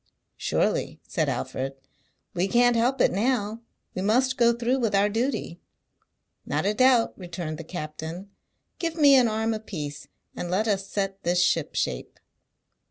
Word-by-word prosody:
"Surely," - - -1
said - - 0
Alfred, 135 +1 -3 0.6
"we 180 +1 0
can't 245 +2 +4
help 245 +4 +1
it - - +4
now. 220 +1 0 0.3
We 185 - -3
must 255 +6 +2
go 235 -1 +4
through 240 +3 0
with 225 -5 +1
our 200 +1 +3
duty." 225 -5 -2 0.8
"Not 150 +5 -2
a 205 - +2
doubt," 250 0 +4
returned 170 -4 -6
the - - -6
captain. 160 +3 -7 0.5
"Give 330 -2 -2
me 290 -4 +6
an 255 -3 +5
arm 220 +1 0
apiece, 155 -10 -6 0.3
and 175 - -4
let 200 +5 +1
us 195 -2 0
set 195 -1 -3
this 175 0 +1
ship 165 -4 0
shape." - - -3
205 Hz, 155 wpm, -26 LUFS, 175-240 Hz, 0.8 s, me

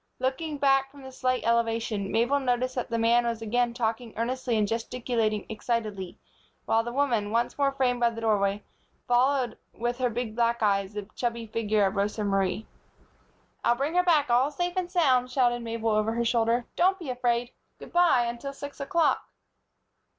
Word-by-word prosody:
Looking 290 +4 -2
back 270 -1 +3
from 280 0 -15
the 265 - -9
slight 255 -1 -1
elevation, 230 -3 0
Mabel 240 +5 +2
noticed 255 -1 0
that 250 - -3
the 230 - -1
man 230 +1 +3
was 235 -1 -2
again 240 +2 +1
talking 230 -1 -3
earnestly 245 0 -1
and 210 -1 +2
gesticulating 230 -1 -1
excitedly; 215 -4 -3 0.5
while 225 0 +2
the 240 - -5
woman, 240 -6 0
once 230 +2 0
more 280 -1 +2
framed 255 -2 0
by 235 -1 +4
the 230 0 -7
doorway, 205 -2 +1 0.4
followed, 250 -1 +2 0.2
with 240 +2 -2
her 250 -1 +2
big 230 -1 -4
black 235 -1 +1
eyes, 200 -1 +1
the 205 -2 -5
chubby 235 -1 -2
figure 215 -2 +1
of 195 - -1
Rosa 205 +2 -1
Marie. 195 +1 0 1.0
"I'll 235 - +3
bring 280 +6 -2
her 360 - +4
back 310 -8 +3
all 250 +4 +4
safe 350 +3 -2
and 365 -1 -1
sound," 265 -9 +2
shouted 245 -2 +1
Mabel, 230 -1 -2
over 215 +1 +1
her 235 0 -1
shoulder. 230 +1 +1
"Don't 375 +2 +3
be 325 -9 -5
afraid. 245 -1 0 0.3
Good - - -12
by, 345 -9 +4
until 240 +4 -5
six 285 +1 -9
o'clock!" 320 +4 +1
240 Hz, 180 wpm, -27 LUFS, 225-260 Hz, 1.0 s, by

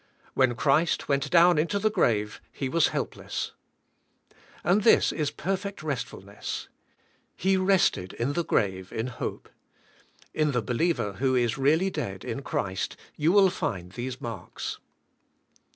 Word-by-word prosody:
When 130 -2 +3
Christ 150 +6 +2
went 140 -1 +1
down 175 -1 +6
into 170 +6 +1
the 215 +2 +1
grave 110 - +1
He 135 - -3
was 165 +3 +3
helpless. - - -4 1.1
And 185 +6 +3
this 225 - +5
is 150 -3 -1
perfect 195 +3 -3
restf 145 -5 -3
ulness. 100 +1 -6 0.7
He 190 +1 +2
rested 185 - +2
in 125 +5 -1
the 170 - 0
grave 95 - 0
in 110 - -2
hope. 125 - -5 0.9
In 150 -2 +1
the 125 -2 0
believer 125 - 0
who 130 +6 +1
is 120 0 +1
really 160 +8 +3
dead 100 - -4
in - - -3
Christ 95 0 -3 0.2
you 155 +3 +2
will 195 -1 +6
find 90 - -3
these 125 +5 -5
marks. 110 -7 -6
140 Hz, 140 wpm, -27 LUFS, 115-175 Hz, 1.1 s, down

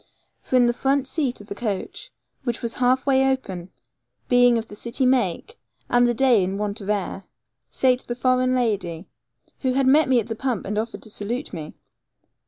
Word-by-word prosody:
For - - -2
in 250 -1 +6
the 240 - +2
front 270 +2 +1
seat 265 -4 -2
of 205 - -14
the 200 - -5
coach, 205 -2 -4 0.3
which 240 -3 -3
was 235 - -2
half 255 +1 +2
way 270 -1 +3
open, 190 -9 -4 0.6
being 245 -1 +5
of 225 0 -4
the 205 - -10
city 235 +5 -2
make, 255 - 0 0.3
and 245 0 +5
the 240 - 0
day 245 -5 +4
in 190 +2 -2
want 210 +1 -3
of 195 - -7
air, 195 -2 -2 0.4
sate 255 - +1
the 240 - -3
foreign 255 0 +2
lady, 195 -8 -1 0.5
who 260 -2 0
had 270 +1 +2
met 285 +2 +5
me 255 -2 +5
at 225 - -2
the 225 - -3
pump 250 -2 -2
and 210 +2 -1
offered 225 +1 -5
to 220 - -10
salute 235 +7 -4
me. 155 -2 -7
240 Hz, 195 wpm, -23 LUFS, 205-260 Hz, 0.6 s, in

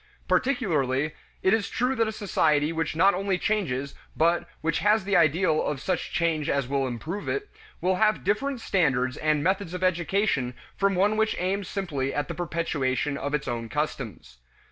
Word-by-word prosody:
Particularly 155 - +1 0.3
is 200 +2 +3
it - - -11
true 250 +2 +1
that 230 -3 +1
a - - -1
society 160 -7 +1
which 160 -1 -2
not 190 +5 +5
only 195 0 0
changes 140 -11 -1 0.2
but 170 +1 +2
which 160 -1 0
has 210 +4 +3
the 200 +1 0
ideal 165 -1 +3
of 145 - -2
such 180 +4 -2
change 165 -3 0
as 140 -3 0
will 135 0 0
improve 150 - -4
it, 415 0 -2 0.3
will 185 +1 +2
have 215 +1 +2
different 245 +6 0
standards 135 - +1
and 155 -1 +1
methods 190 0 0
of 180 - -4
education 175 - +1 0.2
from 195 -1 +1
one 205 +4 +2
which 220 0 +2
aims 190 +1 -1
simply 145 -9 -2
at 145 - -1
the - - -2
perpetuation 150 -5 -1
of 145 +1 -2
its 145 - -3
own 115 -2 -3
customs. 115 - -4
170 Hz, 175 wpm, -26 LUFS, 145-200 Hz, 0.3 s, not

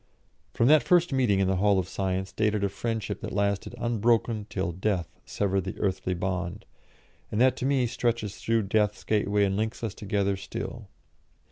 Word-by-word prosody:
From 115 - +3
that 155 +1 +7
first 175 -4 +3
meeting 125 -7 +3
in 95 -1 +2
the 95 0 +1
Hall 100 +1 +3
of 90 -2 0
Science 95 0 -2
dated 105 -1 0
a 100 - +2
friendship 110 +2 -3
that - - -5
lasted 100 +3 -1
unbroken 115 -2 +1
till 95 -2 -2
Death 95 -1 -1 0.2
severed 100 -1 0
the 95 0 -6
earthly 95 -2 -1
bond, 90 -1 -3 0.7
and 105 - -1
that 130 +1 +5
to 130 - -1
me 135 -3 +2
stretches 115 -3 -1
through 115 -1 +1
Death's 105 +1 0
gateway 105 -1 +1
and 95 -1 0
links 110 +3 -2
us 110 -4 -2
together 100 -1 -1
still. 95 - -6
105 Hz, 175 wpm, -27 LUFS, 95-115 Hz, 0.7 s, that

